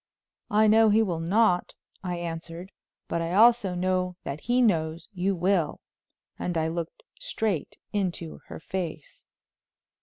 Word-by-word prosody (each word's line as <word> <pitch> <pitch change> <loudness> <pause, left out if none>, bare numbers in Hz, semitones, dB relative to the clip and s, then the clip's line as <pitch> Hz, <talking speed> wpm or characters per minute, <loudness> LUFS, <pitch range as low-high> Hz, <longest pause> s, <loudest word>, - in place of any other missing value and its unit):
"I 215 +1 +4
know 220 +1 +6
he 220 +2 +4
will 175 -6 -2
not," 180 +2 +2 0.3
I 180 -1 -2
answered; 170 +2 -6 0.4
"but 170 - -1
I 165 +1 -2
also 220 -4 +5
know 180 0 0
that 140 +2 -5
he 245 +1 +1
knows 165 -8 +1
you 190 +1 0
will," 180 -2 +1 0.6
and 175 -1 -2
I 160 0 +1
looked 170 - -5 0.2
straight 220 - -2 0.2
into 180 -5 -2
her - - -8
face. 165 -3 -6
180 Hz, 140 wpm, -27 LUFS, 165-210 Hz, 0.6 s, know